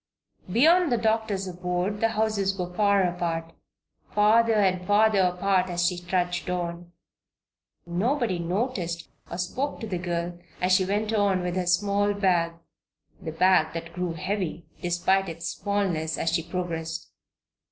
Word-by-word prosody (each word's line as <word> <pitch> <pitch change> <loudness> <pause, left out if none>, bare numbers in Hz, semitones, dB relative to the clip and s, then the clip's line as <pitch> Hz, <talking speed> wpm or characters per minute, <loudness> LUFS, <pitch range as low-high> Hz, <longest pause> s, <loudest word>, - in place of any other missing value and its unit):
Beyond 325 - +5
the 240 - +3
doctor's 220 -3 0
abode 180 +3 -2
the 225 - +4
houses 210 -3 0
were 180 -1 -4
far 200 0 +3
apart 170 -2 -2 0.6
farther 220 +2 +4
and 190 -3 +2
farther 210 0 +4
apart 185 0 +2
as 175 0 0
she 175 0 0
trudged 180 0 -1
on. 175 -1 -4 0.9
Nobody 205 +3 0
noticed 175 -2 -2 0.2
or 170 - -5
spoke 255 +11 -2
to - - -5
the 185 -5 -3
girl 175 0 -3 0.2
as 180 +1 +1
she 185 0 +4
went 210 +3 -1
on 200 -4 +2
with 180 0 -2
her 180 -1 -1
small 200 +3 +2
bag 175 -4 +2 0.7
the 160 - -5
bag 175 0 +3
that 165 0 -6
grew 180 -1 -2
heavy, 175 -1 -3 0.2
despite 180 +2 +1
its 165 +1 -5
smallness, 185 -6 -1
as 165 - 0
she 165 - +2
progressed. 165 -1 -4
185 Hz, 145 wpm, -26 LUFS, 175-205 Hz, 0.9 s, Beyond